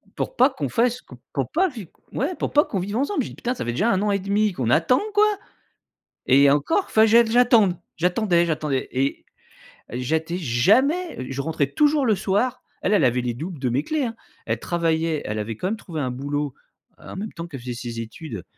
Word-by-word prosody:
Pour - - -3
pas - - +5
qu'on - - -4
fasse, 245 +1 +1
q - - -14 0.2
pour - - -2
pas 370 +4 +3
vi 220 - -9 0.3
ouais 320 +7 -1
pour - - -3
pas 295 +1 +4
qu'on 195 - -3
vive 205 +4 -3
ensemble. 285 +2 0
J'ai - - -6
dit: - - -11
«Putain, 245 +1 -2
ça - - -5
fait 120 - -1
déjà 205 - +1
un 190 0 +1
an 210 - +1
et 200 - +1
demi 200 +2 +1
qu'on 125 -7 -2
attend 165 - +3
quoi!» 420 0 +5 1.0
et 140 +2 +6
encore 235 - +1
fa 220 - +4
que 220 - +6
j'ai 235 +2 +6
que 220 - -4
j'attende. 230 -7 +4 0.2
J'attendais, 175 0 +2
j'attendais 150 -4 -1
et 135 +2 -1 0.7
j'étais 160 +8 -2
jamais 210 - +2
je 135 +1 -2
rentrais 150 -2 -1
toujours 295 - +2
le 215 -3 +3
soir. 210 +7 -1 0.2
Elle, 205 - +1
elle 205 - +4
avait 125 0 +2
les 120 -1 -2
doubles 160 +4 -6
de 130 -2 0
mes 135 +5 0
clés 305 -4 -1
hein. 230 -1 -4 0.3
Elle 115 0 -1
travaillait, 165 -2 0
elle 105 +1 -3
avait 110 +1 -4
quand 185 - -2
même 220 +2 -2
trouvé 160 -7 -6
un 130 - -2
boulot 145 +2 -3 0.4
en - - -11
même 210 +3 -5
temps 170 -1 -6
qu'elle 140 -6 -8
faisait 125 0 -5
ses 115 -1 -6
études, 115 - -8
175 Hz, 225 wpm, -23 LUFS, 135-230 Hz, 1.0 s, et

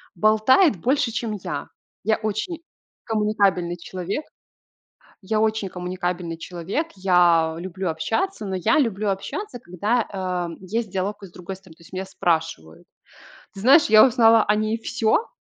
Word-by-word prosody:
болтает 215 - +4
больше, 260 - +1
чем 225 -1 -3
я. - - -4 0.4
Я 220 0 +2
очень 220 - -3 0.4
коммуникабельный 200 -5 +1
человек 185 - -5 1.0
Я 215 +3 -1
очень 220 -2 0
коммуникабельный 180 -2 -4
человек. 180 - -4
Я 175 -4 +3
люблю 185 0 -4
общаться, 225 - -2
но 190 - -3
я 200 - +2
люблю 215 -6 0
общаться, 245 - -4
когда, 215 +5 -1
а, 180 -3 -3
есть 215 +4 -3
диалог 200 +2 -3
и 195 - -8
с - - -20
другой 180 +2 -8
стороны, 185 -4 -17
то 170 - -24
есть 165 - -18
меня 190 +1 -3
спрашивают. 160 - -2 0.7
Ты 195 - -10
знаешь, 275 +9 +6
я 215 0 +7
узнала 225 -2 +5
о 210 - +2
ней 215 +1 -1
всё 235 - +1
195 Hz, 150 wpm, -23 LUFS, 180-225 Hz, 1.0 s, я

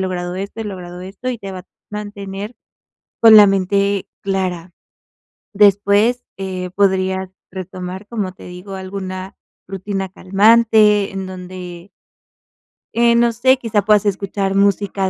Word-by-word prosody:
logrado 180 -1 -3
esto, 200 +3 -6
he - - -4
logrado 180 -3 -7
esto", 195 +7 -7
y 240 - -5
te 195 -2 -7
va 185 - -7
a 180 - -20 0.2
mantener 205 +1 -6 0.7
con 225 -1 +9
la 205 -1 +9
mente 200 +1 +1 0.2
clara. 185 -3 -2 0.8
Después, 205 +4 +3
eh, 185 -2 -4
podrías 190 -1 +1 0.2
retomar, 185 +1 -7
como 205 -6 -3
te 185 - -15
digo, 180 +2 -10
alguna 190 0 -6 0.3
rutina 195 0 -4
calmante 210 +1 +4
en 195 -1 -4
donde 180 -1 -9 1.0
eh, 235 0 +4
no 235 0 +3
sé, 260 +3 +3
quizá 225 -4 0
puedas 210 0 +3
escuchar 195 0 -1
música 200 -1 +1
195 Hz, 130 wpm, -18 LUFS, 185-210 Hz, 1.0 s, con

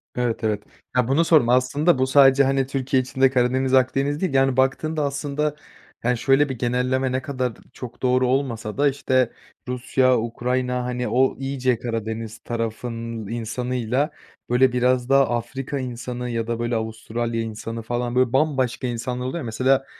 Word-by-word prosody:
Evet, 120 -2 -1
evet. 105 -1 0 0.3
Ya, 125 -2 +2
bunu 145 +6 +3
sordum 150 -8 +4
aslında, 135 +6 +3
bu 130 - +2
sadece, 135 0 +6
hani, 135 -1 +1
Türkiye 135 -1 0
içinde 130 +1 +2
Karadeniz, 130 +1 +1
Akdeniz 135 +3 +2
değil, 185 -6 0
yani, 135 -1 +3
baktığında 150 +4 +1
aslında, 145 +1 -2 0.5
yani, 125 +1 +1
şöyle 135 +4 +3
bir 130 - -4
genelleme 125 +2 0
ne 130 - -1
kadar 130 -3 -2 0.2
çok 120 -2 -9
doğru 125 0 +2
olmasa 125 -5 -1
da, 145 0 +4
işte, 130 -3 +1 0.4
Rusya, 125 0 +2
Ukrayna, 125 +2 -1
hani, 125 0 -2
o 130 +2 +2
iyice 130 -3 -1
Karadeniz 115 -1 -4
tarafının 115 -1 -4
insanıyla, 125 +4 -2 0.4
böyle, 125 +1 +4
biraz 125 0 +1
daha 135 0 +4
Afrika 135 +4 -5
insanı 125 -1 -5
ya 115 -1 -2
da, 115 -1 -2
böyle, 120 0 -1
Avustralya 115 +1 -3
insanı 115 +1 -5
falan, 120 +1 -3
böyle, 130 -1 +2
bambaşka 130 -3 +1
insanlar 125 +1 -3
oluyor 130 +6 -3
ya, 165 - -4
mesela 130 +4 +1
125 Hz, 160 wpm, -23 LUFS, 120-135 Hz, 0.5 s, sadece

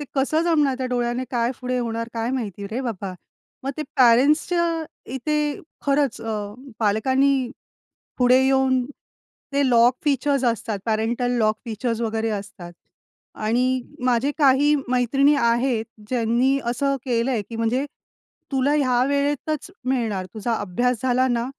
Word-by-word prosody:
ते - - -4
कसं 295 +4 +1
जमणार, 300 -6 +2
त्या 260 - -2
डोळ्याने 245 +1 -1
काय 240 -1 +1
पुढे 250 0 -1
होणार 230 -1 -3
काय 230 +2 -1
माहिती 205 -6 -4
रे 245 +4 -2
बाबा! 200 -6 -4 0.5
मग 275 - -1
ते, 310 - -2
पेरेंट्सच्या 290 +8 +4 0.5
इथे 295 +2 -1 0.3
खरंच 275 -4 +1
अ, 210 -2 -4 0.3
पालकांनी, 260 +5 +2 0.7
पुढे 250 +1 +5
येऊन, 265 -1 +2 0.7
ते 280 -1 +2
लॉक 240 0 +5
फीचर्स 280 -2 +1
असतात, 225 -3 -1
पॅरेंटल 230 +3 0
लॉक 215 -1 +2
फीचर्स 230 0 -3
वगैरे 225 -1 -1
असतात 195 -4 -6 0.6
आणि 250 +4 +1 0.2
माझे 255 +2 +2
काही 285 +1 +4
मैत्रिणी 270 +4 +3
आहेत 235 0 +1 0.2
ज्यांनी 250 +3 +2
असं 275 +4 0
केलंय, 240 -2 0
की 225 +3 -9
म्हणजे, 235 +4 0 0.7
तुला 270 +2 +2
ह्या 255 -4 +2
वेळेतच 290 +3 -1
मिळणार, 225 -8 -1
तुझा 225 +2 -1
अभ्यास 235 +5 -1
झाला 255 0 +2
ना, 235 -1 0
250 Hz, 135 wpm, -23 LUFS, 230-270 Hz, 0.7 s, पुढे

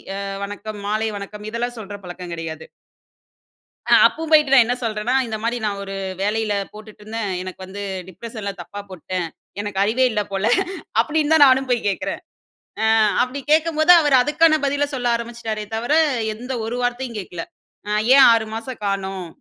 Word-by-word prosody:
அ - - -4 0.3
வணக்கம் 205 +1 -7
மாலை 215 +2 0
வணக்கம் 210 +1 -8
இதெல்லாம் 240 +1 -3
சொல்ற 205 -1 -7
பழக்கம் 180 0 -8
கெடையாது. 160 -1 -6 1.2
அ - - 0
அப்பவும் 320 0 -2
போயிட்டு 300 -3 +5
நான் 260 -3 +8
என்ன 245 - 0
சொல்றேன்னா, 220 +2 -1
"இந்த 220 -1 -3
மாதிரி 235 +1 0
நான் 200 -2 -2
ஒரு 195 0 -6 0.3
வேலையில 215 +1 0 0.2
போட்டுட்டுருந்தேன். 215 0 -6
எனக்கு 185 0 -8
வந்து 200 +2 -7 0.3
டிப்ரஷன்ல 215 +2 -6
தப்பா 205 - -8
போட்டுட்டேன். 185 -1 -4 0.3
எனக்கு 205 -2 -4
அறிவே 235 +5 +2
இல்ல 210 -1 0
போல" 195 +2 -1 0.5
அப்டீன்னு 310 0 +1
தான் 305 -2 +8
நானும் 265 0 +3
போய் 240 -2 +1
கேக்றேன். 195 - -3 1.0
அப்டி 255 +3 -3
கேக்கும்போது, 315 +1 +5
அவர் 290 -3 +2
அதுக்கான 310 +4 +4
பதில 285 +1 +1
சொல்ல 250 -2 -3
ஆரம்பிச்சுட்டாரே 230 -2 -5
தவிர, 235 +5 -1 0.4
எந்த 250 +4 -7
ஒரு 230 +2 -3
வார்த்தையும் 245 -1 -2
கேக்கல. 175 -3 -6 0.5
ம், 210 0 +1
ஏன் 275 -1 +9
6 225 -1 +2
மாசம் 230 +2 -6
காணோம். 195 -2 -3
220 Hz, 160 wpm, -21 LUFS, 200-255 Hz, 1.2 s, ஏன்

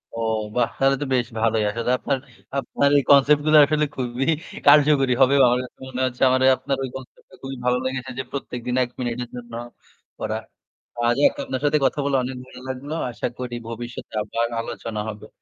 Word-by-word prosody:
ও - - -6 0.4
বাহ! 120 -2 +2
তাহলে 135 0 +4
তো - - -1
বেশ 120 -2 +1
ভালোই। 110 -1 +2
আসলে 115 +3 -1
আপনার, 135 +1 -1 0.4
আপনার 140 +1 +1
এই 140 - +3
concept 145 +1 +6
গুলা 155 0 +6
আসলে 150 0 +1
খুবই 125 +1 -2 0.4
কার্যকরী 145 -3 +6
হবে। 135 +1 +6
আমার 125 +1 +2
কাছে 125 - -13
মনে 130 0 -4
হচ্ছে 125 0 -5
আমারে 130 0 +3
আপনার 135 +1 -2
ওই 130 - -3
concept 130 -1 -11
টা - - -14
খুবই 135 -1 -6
ভালো 125 0 +3
লেগেছে 130 0 -3
যে - - -1
প্রত্যেকদিন 125 -3 -4
১ 120 - -5
মিনিটের 120 0 -3
জন্য 120 -1 -9 0.7
করা। - - -2 0.7
আজ 120 - +3
এক - - -2
আপনার 130 -1 -4
সাথে 150 +1 +3
কথা 150 - +1
বলে 140 -1 +1
অনেক 130 0 -5
ভালো 125 - -13
লাগলো। 135 +4 -5 0.2
আশা 115 - -3
করি 125 -1 -4
ভবিষ্যতে 120 0 -7
আবার 115 +2 -1
আলোচনা 115 -2 -5
হবে। 105 0 -9
125 Hz, 190 wpm, -23 LUFS, 120-135 Hz, 0.7 s, concept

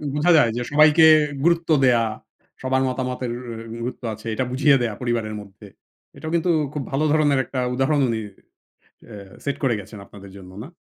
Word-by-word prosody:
বোঝা 155 +4 +3
যায় 120 -6 +4
যে - - -2
সবাইকে 150 +2 +5 0.4
গুরুত্ব 170 0 +1
দেয়া, 120 -3 +4 0.6
সবার 130 0 0
মতামতের 125 -1 -3 0.4
এ 115 - -8
গুরুত্ব 125 +2 -6
আছে। 110 +1 -13
এটা 120 - -1
বুঝিয়ে 140 +2 +4
দেয়া 115 -3 -1
পরিবারের 115 -3 -2
মধ্যে। 100 +1 -15 0.5
এটাও 160 - -6
কিন্তু 170 +1 0 0.2
খুব 145 - -3
ভালো 135 +3 0
ধরনের 145 -3 +2
একটা 130 - -5
উদাহরণ 135 +3 +1
উনি 115 -1 -1 0.9
অ্যা 100 -4 -12
সেট 140 - -2
করে 130 -3 +2
গেছেন 105 +2 -11
আপনাদের 100 -1 -14
জন্য 90 -1 -13
না? - - -9
130 Hz, 170 wpm, -22 LUFS, 115-145 Hz, 0.9 s, সবাইকে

